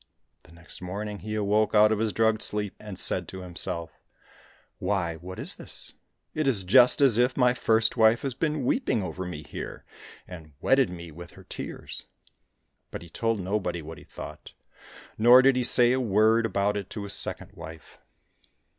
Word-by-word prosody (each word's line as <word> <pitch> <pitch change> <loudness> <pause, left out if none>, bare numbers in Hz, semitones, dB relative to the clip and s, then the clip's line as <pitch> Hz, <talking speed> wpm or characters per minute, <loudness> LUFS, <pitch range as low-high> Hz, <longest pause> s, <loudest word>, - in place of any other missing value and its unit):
The 80 - -18
next 85 +1 -9
morning 100 +3 -5
he 110 0 -5
awoke 105 +1 +1
out 105 +1 +6
of 110 - 0
his 110 -1 0
drugged 110 +2 +1
sleep, 105 -2 -2
and 105 -3 -9
said - - +2
to 95 - -8
himself, 85 -2 -6 0.4
" - - -29
Why, 85 -5 -1
what 90 +3 -9
is - - +1
this? - - -7 0.4
It 155 -2 -1
is 110 -8 +2
just 125 +8 +5
as 125 -5 +5
if 125 +1 +2
my 125 -2 +4
first 115 -1 +1
wife 110 +1 +4
has 135 -2 -2
been 150 0 -2
weeping 125 - 0
over 95 0 -5
me 85 -4 -7
here, - - -8 0.4
and 80 -4 -11
wetted 135 -2 +3
me 85 -2 -9
with 85 +3 -11
her - - -15
tears! - - -8 0.4
" - - -50
But - - -8
he 85 - -13
told 115 +4 -1
nobody 90 -3 -2
what 80 0 -9
he - - -15
thought, - - -10 0.7
nor 120 +3 +7
did 135 0 +5
he 125 - 0
say 120 0 +4
a 130 - +1
word 110 +1 +3
about 100 0 0
it 100 -2 -6
to 105 - -6
his 100 - 0
second - - +2
wife. 80 0 -12
105 Hz, 190 wpm, -26 LUFS, 90-115 Hz, 0.7 s, nor